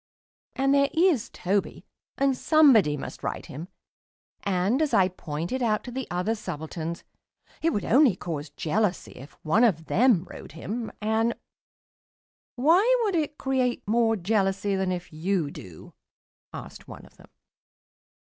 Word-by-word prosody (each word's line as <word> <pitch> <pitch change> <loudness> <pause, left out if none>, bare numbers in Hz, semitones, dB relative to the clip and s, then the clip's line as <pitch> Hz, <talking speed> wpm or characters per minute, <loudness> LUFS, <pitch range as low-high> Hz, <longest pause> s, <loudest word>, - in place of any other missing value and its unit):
And 270 +1 +2
there 280 0 +3
is 330 - +2
Toby, 195 +2 -2 0.3
and 275 -1 +2
somebody 250 - +4
must - - -8
ride - - -4
him, 155 +6 -8 0.7
and, 200 - 0
as 305 -2 +1
I 185 -1 +4
point 165 +1 -5
out 215 -3 +1
to 245 - -8
the 260 +1 -5
other 180 +5 -1
subalterns, 165 -4 -6 0.6
it 330 - +2
would 210 - -2
only 260 -4 +4
cause 160 -5 -5
jealousy 180 +6 -1
if 135 +4 -13
one 185 +9 +3
of 170 -9 +2
them 225 -4 +3
rode 170 - -11
him, 220 +8 -5
and 220 +2 +1 0.6
" - - -92
"Why 355 - +4
would 410 -3 0
it 300 -3 -1
create 260 -4 -1
more 225 +1 +2
jealousy 195 0 0
than 190 -1 -1
if 180 -2 -5
you 165 -1 -1
do?" 90 - -12 0.6
asked - - -10
one - - -11
of - - -21
them. - - -18
210 Hz, 150 wpm, -26 LUFS, 175-260 Hz, 0.7 s, somebody